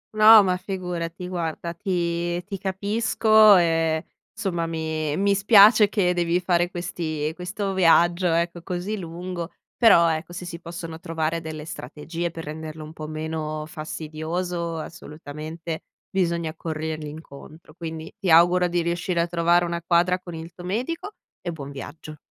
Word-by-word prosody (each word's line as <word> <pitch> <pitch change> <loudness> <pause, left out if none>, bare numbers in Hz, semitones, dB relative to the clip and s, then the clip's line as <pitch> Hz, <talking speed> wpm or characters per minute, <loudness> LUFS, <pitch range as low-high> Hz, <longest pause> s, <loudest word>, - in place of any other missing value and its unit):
No, 215 0 +9
ma 185 -1 +1
figurati. 180 -2 -5
Guarda 170 -1 -3
ti 175 -1 -1
ti 195 +1 -6
capisco 215 +2 +4
e, 165 -1 +1 0.3
insomma, 180 -6 -2
mi 160 -2 -2
mi 200 +1 +3
spiace 205 +1 +7
che 185 -4 +2
devi 175 0 +1
fare 175 -1 +1
questi 160 -4 -3
questo 190 +3 -4
viaggio, 175 0 +4
ecco, 170 +1 0
così 180 +4 -3
lungo. 175 0 -5 0.3
Però, 205 -8 +6
ecco, 160 +1 -4
se 180 +1 -7
si 170 -1 -7
possono 165 -1 -7
trovare 165 -1 -2
delle 155 -1 -7
strategie 165 +4 -5
per 165 0 -8
renderlo 155 +1 -7
un 155 +1 -10
po' 155 -1 -7
meno 155 0 -4
fastidioso, 165 +2 -4
assolutamente, 155 +1 -7 0.3
bisogna 170 -4 0
corrergli 160 -1 -4
incontro, 155 +1 -12
quindi 160 -1 -7
ti 190 - -1
auguro 175 +2 +6
di 175 -1 0
riuscire 170 +1 -1
a 170 - +3
trovare 175 0 +3
una 170 0 -3
quadra 175 +1 +3
con 175 -2 -9
il 165 +1 -8
tuo 175 - -11
medico 295 - -3 0.3
e 175 - -3
buon 140 -4 -8
viaggio. 150 +2 -9
170 Hz, 150 wpm, -24 LUFS, 160-180 Hz, 0.3 s, No